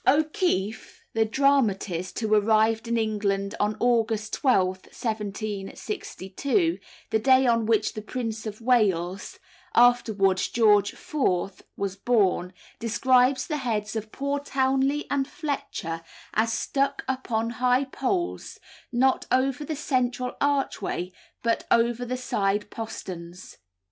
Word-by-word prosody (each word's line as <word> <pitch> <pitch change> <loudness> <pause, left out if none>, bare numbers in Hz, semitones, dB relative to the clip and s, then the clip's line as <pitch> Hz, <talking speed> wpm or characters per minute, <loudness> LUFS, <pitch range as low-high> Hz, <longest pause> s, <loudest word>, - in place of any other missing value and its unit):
O'Keefe, 290 - 0
the 225 0 +2
dramatist, 215 -9 +1
who 220 -2 0
arrived 220 +2 +3
in 235 0 0
England 205 -3 -1
on 210 +1 0
August 225 -3 +1
12, 185 -8 +1
1762, 215 - -3 0.3
the 220 - +3
day 260 +3 +5
on 230 -2 +2
which 220 -2 +2
the 215 - -5
Prince 225 -1 -4
of 210 0 -6
Wales 200 -6 +1 0.4
(afterwards 215 -6 +4
George 210 -3 +3
IV.) 195 - -1 0.2
was 195 -1 -2
born, 195 -4 +1 0.3
describes 255 +3 +3
the 305 - -2
heads 220 -5 -2
of 215 0 -4
poor 280 +1 -2
Townley 270 +1 +1
and 275 -1 +1
Fletcher 220 - -4 0.3
as 225 +1 +2
stuck 275 +4 -1
up 260 -1 -3
on 225 +1 0
high 250 +1 +4
poles, 345 +7 -3 0.3
not 260 +2 +2
over 260 +2 +1
the 310 +1 -3
central 255 -3 -1
archway, 270 -10 -1 0.3
but 230 -1 0
over 235 +1 +2
the 255 +1 -3
side 205 -4 -1
posterns. 180 -5 -8
225 Hz, 120 wpm, -26 LUFS, 205-260 Hz, 0.4 s, day